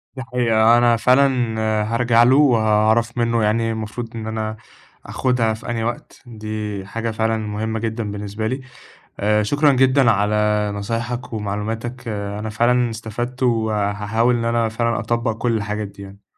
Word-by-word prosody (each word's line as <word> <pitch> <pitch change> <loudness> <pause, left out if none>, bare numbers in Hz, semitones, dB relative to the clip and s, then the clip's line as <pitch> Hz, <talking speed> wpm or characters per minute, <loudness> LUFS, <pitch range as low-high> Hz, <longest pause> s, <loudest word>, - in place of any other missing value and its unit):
دي 130 - -5
حقيقة، 120 -3 +3
أنا 120 -1 +4
فعلًا 125 -3 +2 0.3
هارجع 120 0 +4
له 125 +2 +5
وهاعرف 115 -3 +3
منه 115 -1 +1
يعني 115 +2 +1
المفروض 115 +1 -5
إن 110 -1 -5
أنا 110 0 -3 0.5
أخدها 125 -4 0
في 110 - -8
أنهي 115 -1 -2
وقت، 120 +1 -5
دي 110 -3 -5
حاجة 115 +3 -3
فعلًا 110 +1 0
مهمّة 110 +1 -3
جدًا 110 -1 -3
بالنسبة 105 +1 -4
لي، 130 +4 -3 0.6
آآ 105 +1 +2
شكرًا 145 +7 +3
جدًا 130 -1 +4
على 105 0 +1 0.4
نصايحك 115 +5 -4
ومعلوماتك، 110 +3 -4
أنا 105 0 -4
فعلًا 120 +2 +2
استفدت، 120 +3 -5
وهاحاول 110 0 +1
إن 115 - -2
أنا 115 -1 +1
فعلًا 115 +1 -1
أطبّق 115 +2 -1
كل 120 -1 0
الحاجات 105 0 -3
دي 100 0 -13
يعني. 100 +1 -13
115 Hz, 150 wpm, -20 LUFS, 105-120 Hz, 0.6 s, له